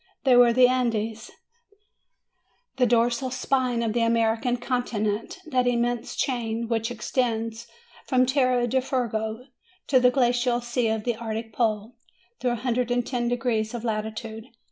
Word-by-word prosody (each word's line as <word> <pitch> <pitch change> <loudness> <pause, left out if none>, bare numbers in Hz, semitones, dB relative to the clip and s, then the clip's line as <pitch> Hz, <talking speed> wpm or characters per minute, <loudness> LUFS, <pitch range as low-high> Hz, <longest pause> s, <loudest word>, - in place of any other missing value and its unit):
They 260 -3 +5
were 245 -1 +7
the 250 +1 +6
Andes, 230 -3 -1 1.5
the 250 -1 +3
dorsal 240 +2 +2
spine 255 -2 0
of 220 -2 -1
the 240 - +1
American 230 +1 +1
continent, 230 - -2
that 255 -5 +1
immense 240 -1 -1
chain 230 -3 -2
which 225 0 -1
extends 230 -1 -2 0.4
from 255 -2 +3
Tierra 255 -2 +2
del 260 +2 +1
Fuego 235 -3 -2 0.4
to 260 - +4
the 250 0 +5
glacial 245 -1 +2
sea 240 0 -1
of 220 -1 -1
the 240 -1 -1
Arctic 225 -1 -5
pole, 220 0 -1 0.4
through 250 - 0
a 240 - 0
hundred 245 +1 -1
and 245 -1 0
ten 245 -2 -2
degrees 235 -2 -1
of 235 - -5
latitude. 220 0 -4
240 Hz, 145 wpm, -25 LUFS, 225-250 Hz, 1.5 s, were